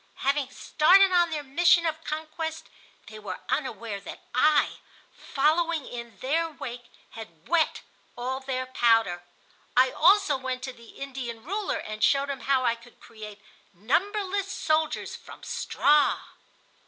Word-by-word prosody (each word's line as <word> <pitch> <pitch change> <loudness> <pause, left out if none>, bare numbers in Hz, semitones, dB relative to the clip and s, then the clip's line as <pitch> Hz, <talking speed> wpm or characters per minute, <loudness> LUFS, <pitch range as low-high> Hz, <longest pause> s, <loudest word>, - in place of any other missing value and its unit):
Having 275 -1 +1
started 370 +8 +4
on 350 -1 +4
their 305 -2 -3
mission 335 +5 +4
of 320 0 -2
conquest, 320 +1 -5 0.4
they 215 -1 -10
were 210 - -7
unaware 230 -7 -2
that - - -9
I, 295 +4 +3 0.4
following 315 +2 0
in 235 -1 -8
their 325 +5 0
wake, 245 -5 -8 0.3
had 170 -8 -12
wet 335 -2 +1 0.4
all 255 +2 -3
their 260 -1 -3
powder. 225 -8 +2 0.6
I 255 0 +5
also 360 -3 +4
went 260 -1 -4
to 260 - -5
the 235 -2 -16
Indian 255 -4 -6
ruler 400 +7 -2
and 215 0 -5
showed 280 0 +3
him 275 - -5
how 260 +1 +1
I 235 - +3
could 235 +1 -16
create 210 -2 -11 0.3
numberless 390 - -1
soldiers 310 -2 -1
from - - -13
straw. 295 0 +2
275 Hz, 140 wpm, -27 LUFS, 240-320 Hz, 0.6 s, I